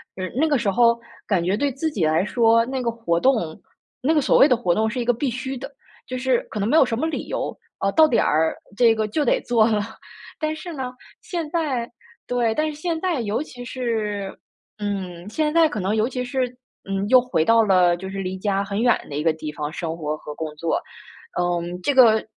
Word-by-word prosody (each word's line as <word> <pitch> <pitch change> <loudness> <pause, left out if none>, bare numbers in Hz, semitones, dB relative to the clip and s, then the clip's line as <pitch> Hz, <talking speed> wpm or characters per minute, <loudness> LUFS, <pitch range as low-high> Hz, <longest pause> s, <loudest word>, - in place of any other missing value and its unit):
嗯， 185 -1 -4
那 305 +5 +2
个 295 -2 +2
时 235 -4 0
候 235 +3 +4 0.3
感 185 -5 +1
觉 185 +3 +1
对 280 +6 0
自 280 +5 -2
己 200 - -1
来 160 +4 +2
说， 230 0 +3
那 260 +1 -3
个 240 - 0
活 225 -8 -1
动 265 +7 +4 0.7
那 275 - +2
个 310 - +4
所 - - +3
谓 275 - +8
的 250 -5 +3
活 205 -7 +1
动 220 +4 +1
是 250 - -4
一 240 - -1
个 245 - +3
必 260 +4 -1
须 260 +2 -4
的 270 - -8 0.4
就 255 - -4
是 255 -1 +1
可 215 - -4
能 200 - 0
没 275 - +2
有 320 - +7
什 230 -3 -2
么 315 - 0
理 320 - -3
由， - - -3 0.2
啊， 195 - 0
到 315 +6 +6
点 245 - +2
儿 160 +1 +2 0.2
这 230 0 +5
个 220 -1 -1
就 295 +9 0
得 250 - +2
做 230 -2 +3
了。 215 -2 +2 0.6
但 310 0 -1
是 340 +2 -7
呢， 260 -4 -4 0.3
现 345 -6 -4
在 280 -9 -1 0.4
对， 235 -2 0
但 310 0 +1
是 305 - -3
现 335 -1 -2
在 340 -7 0
尤 220 +4 -1
其 245 -5 -10
是 220 -6 -3 0.4
嗯， 190 -3 -4
现 300 +5 0
在 330 -1 +5
可 215 - -4
能 195 +3 0
尤 220 +1 +2
其 250 -1 -3
是， 255 0 -1 0.4
嗯， 195 +1 -1
又 255 +1 +8
回 250 -10 0
到 230 +4 +5
了 180 -4 +4
就 190 - -7
是 195 0 -5
离 190 0 -3
家 195 0 0
很 200 +1 -3
远 240 -1 +5
的 145 - -6
一 150 - -1
个 165 -1 +3
地 155 -1 -6
方 150 0 -4
生 165 -1 -4
活 155 -2 -2
和 150 - -9
工 155 -1 -5
作。 165 +2 0 0.6
嗯， 175 0 -1
这 285 - +1
个 225 -4 +6
230 Hz, 250 characters per minute, -23 LUFS, 190-260 Hz, 0.7 s, 谓